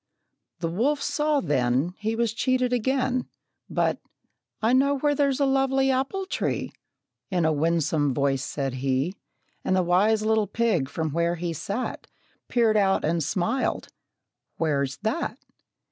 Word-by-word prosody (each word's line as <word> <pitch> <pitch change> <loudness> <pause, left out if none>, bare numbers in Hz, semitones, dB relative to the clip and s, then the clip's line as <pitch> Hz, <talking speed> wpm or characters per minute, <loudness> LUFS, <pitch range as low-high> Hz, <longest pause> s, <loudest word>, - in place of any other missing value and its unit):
The 165 - 0
wolf 245 - +1
saw 300 0 +1
then 135 +2 +1
He 220 +1 -1
was 230 -1 0
cheated 255 +1 +1
again; 255 +1 0 0.4
But, - - 0 0.6
"I 225 +3 +2
know 280 +2 +3
where's 285 -1 +1
a 280 - +3
lovely 270 0 +2
apple 270 +10 -1
tree," - - -2 0.6
In 180 -4 +1
a 160 - +3
winsome 155 -1 +1
voice 135 0 0
said 135 -3 -3
he. 135 +7 0 0.5
And 185 - +1
the 185 - +3
wise 205 +5 +3
little 220 -1 +2
pig, 205 -10 0
from 160 +1 -2
where 170 +2 +1
he 170 0 -3
sat, 200 - -4 0.4
Peered 225 -3 +3
out 195 -2 +2
and 165 +1 +1
smiled, 185 - -1 0.7
"Where's 140 -4 0
that?" 225 +10 -1
205 Hz, 140 wpm, -25 LUFS, 160-255 Hz, 0.7 s, know